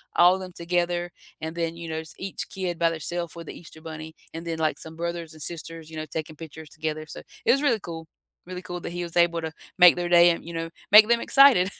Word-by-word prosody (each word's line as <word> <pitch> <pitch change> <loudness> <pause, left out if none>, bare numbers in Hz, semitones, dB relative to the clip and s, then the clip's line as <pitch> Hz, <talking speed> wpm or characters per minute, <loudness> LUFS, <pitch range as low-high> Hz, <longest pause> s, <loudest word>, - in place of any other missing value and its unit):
all 175 +1 +7
of - - -5
them 185 -1 -8
together 175 0 -1 0.3
and 160 0 -4
then, 165 -1 -2
you 170 -1 -7
know, 160 0 -2
s 160 -1 -9
each 195 0 -5
kid 180 -3 -4
by 170 - +4
their 165 -1 -4
self 170 0 -4
with 170 -1 -9
the - - -6
Easter 160 -2 -14
Bunny 160 0 -8 0.2
and 165 +1 -7
then, 165 -1 -2
like, 155 -1 0
some 160 0 -8
brothers 170 -1 -4
and 155 - -13
sisters, 165 -1 -7
you 160 - -9
know, 155 - -3
taking 155 0 -6
pictures 160 -1 -10
together, 155 0 -3
so - - -8 0.2
it - - +6
was 275 +3 +2
really 240 -6 +3
cool, 165 -3 -8 0.4
really 180 0 -6
cool 180 -1 -6
that - - -5
he 175 0 -4
was 170 0 -5
able 170 -1 +3
to 160 -1 -4 0.3
make 180 -1 +9
their 175 -1 -2
day 175 0 +7
and, 170 - -1
you 170 - -7
know, 165 0 -3 0.2
make 210 +1 +10
them 235 0 +3
excited. 250 -10 +6
170 Hz, 260 wpm, -25 LUFS, 160-175 Hz, 0.4 s, make